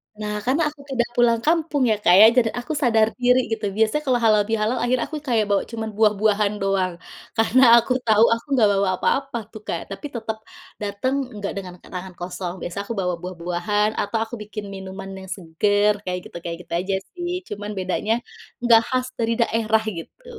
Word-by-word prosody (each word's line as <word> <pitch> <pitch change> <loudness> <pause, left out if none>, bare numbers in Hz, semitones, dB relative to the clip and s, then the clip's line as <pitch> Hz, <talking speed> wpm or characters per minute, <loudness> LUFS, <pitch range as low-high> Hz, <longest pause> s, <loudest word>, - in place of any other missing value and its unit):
Nah, 210 0 -4
karena 275 +7 +2
aku 290 -1 -16
tidak 240 -3 0
pulang 240 -1 +4
kampung 315 -3 +2
ya 215 - +3
Kak 180 - +6
ya, - - +11
dan 230 -3 +5
aku 245 +6 -4
sadar 235 -7 +3
diri 250 +1 +5
gitu 215 -1 -3
biasanya 220 +7 +2
kalau 255 -2 +3
halalbihalal 220 +2 +2
akhirnya 250 0 +1
aku 310 - -4
kayak 235 -7 +1
bawa 200 -1 +3
cuman 225 -1 -4
buah 215 -1 +5
buahan 210 -1 +2
doang. 190 -2 +1 0.4
Karena 235 +4 +4
aku 235 - +1
tahu 220 -1 +5
aku 230 +3 -4
nggak 220 -5 +5
bawa 195 0 +1
apa-apa 270 +3 0
tuh 215 - -10
Kak, 170 - -2
tapi 195 - -9
tetep 220 -1 -3 0.4
dateng 205 +6 -1 0.2
enggak 205 -1 -3
dengan 185 -2 -6
tangan 185 0 -7
kosong, 175 0 -5
biasa 175 - -6
aku 230 - -3
bawa 180 -2 0
buah 180 +1 -6
buahan 180 +5 0
atau 205 +3 -2
aku 225 +1 -7
bikin 210 0 -7
minuman 190 0 -7
yang 190 0 -10
seger 205 +4 +2
kayak 180 -1 -3
gitu - - -9
kayak 170 -1 -4
gitu 170 - -9
aja 190 +2 -1 0.2
sih, 350 0 -4 0.2
cuman 205 0 -5
bedanya 190 +4 0 0.5
enggak 235 -2 +6
khas 255 -1 0
dari 230 0 +1
daerah, 220 -1 +2 0.2
gitu. 325 - -11
215 Hz, 190 wpm, -22 LUFS, 195-240 Hz, 0.5 s, ya